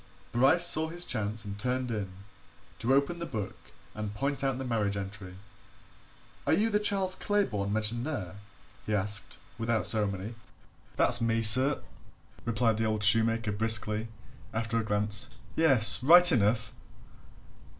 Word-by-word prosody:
Bryce 135 +9 +2
saw 160 -2 +5
his 175 +2 -2
chance 110 -1 -3
and 100 0 -8
turned 125 +2 -3
in 100 -4 -5 0.7
to 120 - -1
open 140 +5 -1
the 170 - -5
book 105 -3 -6 0.4
and 105 -1 -7
point 140 +4 -3
out 135 -2 -1
the 135 - -6
marriage 105 -4 -2
entry. 95 -1 -8 1.1
"Are - - +2
you 225 +2 0
the 210 - +1
Charles 195 -3 0
Claybourne 185 - -2
mentioned 110 +2 +1
there?" 100 - -6 0.5
he 105 - -1
asked, 105 +1 +1 0.2
without 115 -4 -1
ceremony. 105 0 0 0.6
"That's 120 -1 +3
me, 115 0 -1
sir!" 130 +6 +6 0.6
replied 115 -1 -1
the 110 - -2
old 110 -1 -2
shoemaker 115 +1 +2
briskly, 110 +1 -1 0.5
after 115 +1 -2
a - - -3
glance. 105 -1 -2 0.3
"Yes 130 -10 +5
right 175 +6 +6
enough!" 110 -2 0
115 Hz, 140 wpm, -28 LUFS, 105-135 Hz, 1.1 s, sir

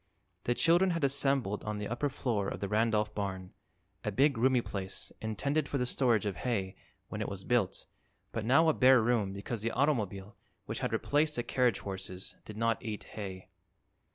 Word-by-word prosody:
The 120 - +1
children 175 +5 +4
had 165 -3 -1
assembled 135 -6 +1
on 105 -1 -3
the 105 0 -3
upper 125 +5 -1
floor 120 -7 -1
of - - -4
the 100 - -2
Randolph 105 0 +1
barn, 95 -3 -4 0.5
a 105 - -1
big, 140 +7 +3
roomy 125 +1 +3
place 95 -4 -6
intended 135 +7 0
for 140 - -1
the 125 - 0
storage 120 -4 +2
of 100 -3 -2
hay, 100 -7 -2 0.3
when - - -4
it - - -2
was 100 -1 -5
built, 120 -6 0 0.5
but 115 - -3
now 140 +8 +5
a 160 - +5
bare 130 -1 +6
room 110 -4 +1
because 100 +3 -5
the 115 - 0
automobile, 110 -8 0 0.3
which - - -4
had - - -1
replaced 150 +1 +1
the 120 - -1
carriage 125 -4 +1
horses, 95 -1 -6
did 105 - -9
not 115 +1 0
eat 110 -3 -4
hay. 95 -3 -7
115 Hz, 185 wpm, -31 LUFS, 100-135 Hz, 0.5 s, bare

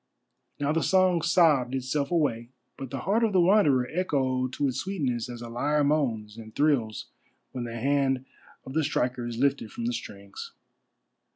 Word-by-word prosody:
Now 145 0 0
the 165 +1 +1
song 185 -2 +3
sobbed 150 -7 +3
itself 135 +2 -1
away, 135 -9 0 0.3
but 135 -2 -7
the 135 +1 -5
heart 215 +5 +1
of 220 -3 +1
the 185 - +4
Wanderer 170 -9 +4
echoed 130 -7 0
to 145 - 0
its 130 - -2
sweetness 135 - -2
as 120 -1 -7
a - - -7
lyre 145 +6 0
moans 115 -8 0
and 110 -1 -11
thrills 130 -8 +1 0.5
when 125 -2 -4
the 115 0 -6
hand 135 +1 +1 0.4
of 130 - -8
the 160 +1 +1
striker 125 -4 -1
is 120 -1 -5
lifted 135 -3 0
from 115 - -5
the 120 - 0
strings. 100 -4 -8
135 Hz, 175 wpm, -27 LUFS, 120-155 Hz, 0.5 s, the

